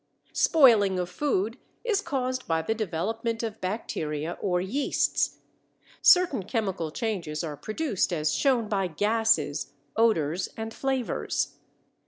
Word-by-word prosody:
Spoiling 225 - +5
of 180 0 -2
food 230 -1 -1 0.2
is 435 -4 +1
caused 255 -6 -2
by 160 -1 +1
the 220 - 0
development 225 +3 -2
of 220 -1 -5
bacteria 160 -6 -3
or 180 -3 +1
yeasts. 230 +11 0 0.6
Certain 355 - +5
chemical 190 -5 -2
changes 175 -5 -3
are 155 -3 -4
produced 215 - -1
as 155 -3 0
shown 255 -6 +2
by 195 -3 0
gases, 210 -5 +1 0.2
odors, 180 -7 +2
and 225 0 -5
flavors. 265 -3 -2
215 Hz, 120 wpm, -27 LUFS, 175-240 Hz, 0.6 s, Spoiling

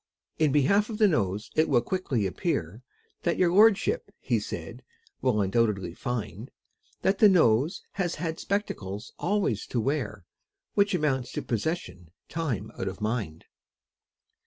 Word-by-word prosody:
In 155 -3 +4
behalf 200 - +3
of 220 - -4
the 215 -1 +5
Nose 105 - -1
it 155 - +3
will 120 -4 +3
quickly 140 - -1
appear, 95 - -2 0.4
And 170 - +1
your 175 -2 +3
lordship, 220 - +4
he - - 0
said, - - -6 0.4
will 125 -5 +2
undoubtedly 100 -3 +1
find, 110 0 -4 0.5
That 195 +1 +2
the 210 - +8
Nose 150 - +3
has 180 -3 -2
had 165 -2 -3
spectacles 105 - -3
always 190 - 0
to 120 - -1
wear, 120 - -2 0.5
Which 200 -1 +3
amounts 135 -6 0
to - - -3
possession 115 - -3 0.2
time 125 - -3
out 95 - -2
of 95 - -5
mind. 105 -8 -3
130 Hz, 140 wpm, -27 LUFS, 105-180 Hz, 0.5 s, the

